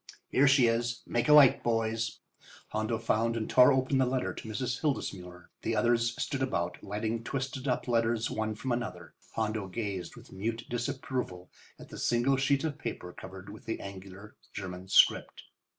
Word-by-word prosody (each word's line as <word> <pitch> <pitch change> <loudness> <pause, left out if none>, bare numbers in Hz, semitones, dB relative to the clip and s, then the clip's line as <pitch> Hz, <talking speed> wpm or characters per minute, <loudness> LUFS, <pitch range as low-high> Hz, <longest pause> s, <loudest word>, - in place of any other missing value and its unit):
Here 140 +2 +4
she 135 -2 +6
is. 115 0 0
Make 120 +3 0
a - - +8
light, 145 -4 +8
boys." 115 -1 -1 0.5
Hondo 110 +1 -1
found 115 0 +1
and 110 - -2
tore 125 +2 +7
open 130 0 +2
the 130 - +4
letter 130 0 -1
to 110 - -8
Mrs. 125 +2 -2
Hildesmuller. 90 - -3
The 115 - -1
others 115 +2 +2
stood 135 -2 -2
about, 85 -10 -1
lighting 110 +3 -3
twisted 135 +1 -4
up 125 - 0
letters 115 -1 +1
one 110 0 -2
from 125 +4 -4
another. 120 -1 -4 0.2
Hondo 110 -2 -1
gazed 95 -3 -4
with - - -14
mute 115 +4 -3
disapproval 120 -6 -4 0.3
at - - -13
the - - -8
single 120 +3 +2
sheet 140 +1 +2
of 155 -2 -3
paper 90 - -5
covered 95 0 -10
with 105 - -12
the 115 - -3
angular 100 +1 -10 0.2
German 95 -1 -6
script. 95 - +4
115 Hz, 170 wpm, -30 LUFS, 105-125 Hz, 0.5 s, a